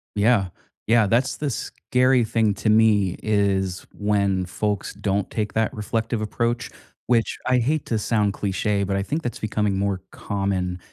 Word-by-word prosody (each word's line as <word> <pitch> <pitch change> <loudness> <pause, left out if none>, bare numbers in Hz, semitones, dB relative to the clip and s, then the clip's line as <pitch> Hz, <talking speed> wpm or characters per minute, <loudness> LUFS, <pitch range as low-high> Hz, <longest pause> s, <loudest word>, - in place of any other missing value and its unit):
Yeah. 105 -1 +3 0.4
Yeah. 115 -2 +4
That's 120 +6 +1
the 150 -2 -2
scary 125 0 +1
thing 110 -1 +1
to 110 - -1
me, 105 -4 +4
is 100 -3 0
when 100 -2 +1
folks 100 +3 -2
don't 100 0 -1
take 105 -2 -3
that 110 0 0
reflective 110 +1 -2
approach, 120 +3 -1 0.4
which 115 -3 +2
I 130 0 +4
hate 145 +6 0
to 115 - 0
sound 105 -2 +1
cliché, 100 +1 -1
but 95 0 -1
I 100 - 0
think 150 +10 -2
that's 120 - -4
becoming 105 -2 0
more 100 -1 -1
common 95 -3 -2
105 Hz, 160 wpm, -23 LUFS, 100-115 Hz, 0.4 s, Yeah